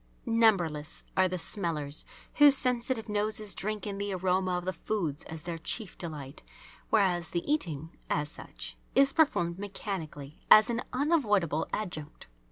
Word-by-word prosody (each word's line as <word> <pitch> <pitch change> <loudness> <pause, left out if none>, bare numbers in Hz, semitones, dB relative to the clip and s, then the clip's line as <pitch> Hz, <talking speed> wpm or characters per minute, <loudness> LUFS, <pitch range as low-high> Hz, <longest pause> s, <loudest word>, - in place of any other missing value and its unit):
Numberless 190 - +2
are 185 -1 +4
the 185 0 -3
"smellers" 160 -6 0 0.3
whose 290 -2 +8
sensitive 250 -2 0
noses 210 0 -1
drink 215 +1 -4
in 200 -1 -4
the 200 -1 -2
aroma 185 0 +1
of 180 - -5
the 185 - -1
foods 165 -5 -3
as 160 -1 -8
their 170 -2 -4
chief 205 +4 -4
delight, 150 -6 -7 0.5
whereas 180 -6 +2
the 170 - -2
eating, 165 - -2
as 150 -2 0
such, - - -7 0.2
is 275 0 +5
performed 175 - +2
mechanically, 165 -8 -6
as 215 +2 +8
an 235 +1 -1
unavoidable 210 - +1
adjunct. 160 -8 -5
185 Hz, 145 wpm, -29 LUFS, 160-215 Hz, 0.5 s, whose